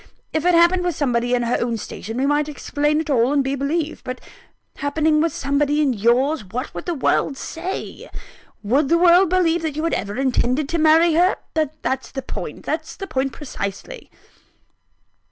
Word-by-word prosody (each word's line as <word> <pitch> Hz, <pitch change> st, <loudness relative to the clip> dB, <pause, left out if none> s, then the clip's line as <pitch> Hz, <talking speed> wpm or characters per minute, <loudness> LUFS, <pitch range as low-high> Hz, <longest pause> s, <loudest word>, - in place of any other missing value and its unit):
If 315 Hz, +1 st, -1 dB
it 355 Hz, -1 st, +4 dB
happened 345 Hz, +2 st, +4 dB
with 350 Hz, -3 st, -1 dB
somebody 245 Hz, -3 st, +1 dB
in 240 Hz, -, 0 dB
her 235 Hz, +1 st, +1 dB
own 235 Hz, -1 st, -1 dB
station, 225 Hz, +1 st, -7 dB
we 265 Hz, -, +1 dB
might 290 Hz, +1 st, +1 dB
explain 295 Hz, +1 st, -1 dB
it 315 Hz, -, -4 dB
all, 245 Hz, 0 st, +3 dB
and 285 Hz, -1 st, +2 dB
be 270 Hz, +1 st, -2 dB
believed: 300 Hz, +3 st, -2 dB
but 255 Hz, 0 st, -5 dB, 0.6 s
happening 305 Hz, +2 st, +1 dB
with 330 Hz, 0 st, +1 dB
somebody 285 Hz, +2 st, 0 dB
in 285 Hz, -4 st, +2 dB
yours, 245 Hz, +6 st, +2 dB
what 235 Hz, +9 st, -5 dB
would -, -, -7 dB
the 345 Hz, -, -1 dB
world 275 Hz, 0 st, +1 dB
say? 350 Hz, +7 st, -6 dB, 0.5 s
Would 265 Hz, +7 st, +2 dB
the 335 Hz, -, +4 dB
world 355 Hz, +1 st, +5 dB
believe 345 Hz, -2 st, +2 dB
you 310 Hz, -, -2 dB
had 330 Hz, -, 0 dB
ever 200 Hz, +3 st, -3 dB
intended 260 Hz, +1 st, +1 dB
to 335 Hz, -, -1 dB
marry 320 Hz, +2 st, +5 dB
her? 355 Hz, +4 st, +3 dB, 0.5 s
That's 265 Hz, 0 st, -2 dB
the 270 Hz, -1 st, -6 dB
point -, -, -7 dB
that's -, -, -3 dB
the 390 Hz, -, -6 dB
point 270 Hz, -6 st, -2 dB
precisely." 200 Hz, -8 st, -6 dB
290 Hz, 180 wpm, -21 LUFS, 255-325 Hz, 0.6 s, world